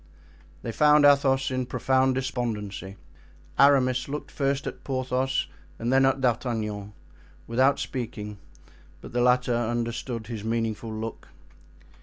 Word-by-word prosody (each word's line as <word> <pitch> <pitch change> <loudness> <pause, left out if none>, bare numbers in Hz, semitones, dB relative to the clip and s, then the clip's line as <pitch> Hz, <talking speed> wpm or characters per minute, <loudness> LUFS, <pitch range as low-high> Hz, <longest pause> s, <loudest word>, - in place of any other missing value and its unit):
They 115 - -3
found 150 +5 +5
Athos 135 -2 +4
in 130 -1 -2
profound 130 0 +2
despondency; 105 -7 -3 0.6
Aramis 130 -3 +4
looked 150 +2 -5
first 140 +1 -1
at - - -6
Porthos 130 0 -1 0.3
and 120 +3 -1
then 135 0 +5
at 135 0 +1
D'Artagnan, 110 -5 -1 0.5
without 130 +4 +3
speaking, 105 -5 -5 0.6
but - - -11
the 120 - +1
latter 125 0 +3
understood 120 0 -2
his 110 -2 -6
meaningful 115 0 -2
look. 110 +1 -6
125 Hz, 120 wpm, -26 LUFS, 115-135 Hz, 0.6 s, found